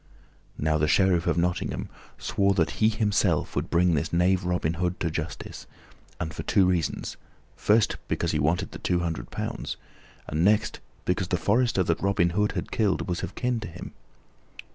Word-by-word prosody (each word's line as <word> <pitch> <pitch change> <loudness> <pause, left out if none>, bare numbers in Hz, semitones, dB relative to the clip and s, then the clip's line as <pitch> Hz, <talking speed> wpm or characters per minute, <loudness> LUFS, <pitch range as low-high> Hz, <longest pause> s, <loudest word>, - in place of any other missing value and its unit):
Now 75 0 +1
the 75 - +2
Sheriff 90 +2 +3
of - - +2
Nottingham 90 +1 -1 0.3
swore 100 -1 +1
that 80 -4 +2
he 110 - +6
himself 105 -6 +1
would - - -1
bring 85 0 +3
this 80 +1 0
knave 90 +2 +2
Robin 90 -2 0
Hood 90 +1 -2
to 85 - -1
justice, 80 0 -5 0.5
and 80 -3 -3
for - - -5
two 95 - +3
reasons: 90 -4 -1 0.4
first, 110 +1 +3
because 85 - 0
he 75 - 0
wanted 80 +5 +1
the - - -8
two 90 -1 0
hundred 85 -2 -3
pounds, - - -4 0.5
and 75 +3 0
next, 105 +3 +2 0.3
because 90 0 0
the 90 - 0
forester 115 0 +2
that 85 -2 0
Robin 95 -3 +2
Hood 105 +3 +1
had - - -4
killed 105 -5 +1
was 90 -1 -2
of - - -5
kin 125 -2 0
to 110 - -6
him. 90 +1 -9
90 Hz, 180 wpm, -26 LUFS, 85-100 Hz, 0.5 s, he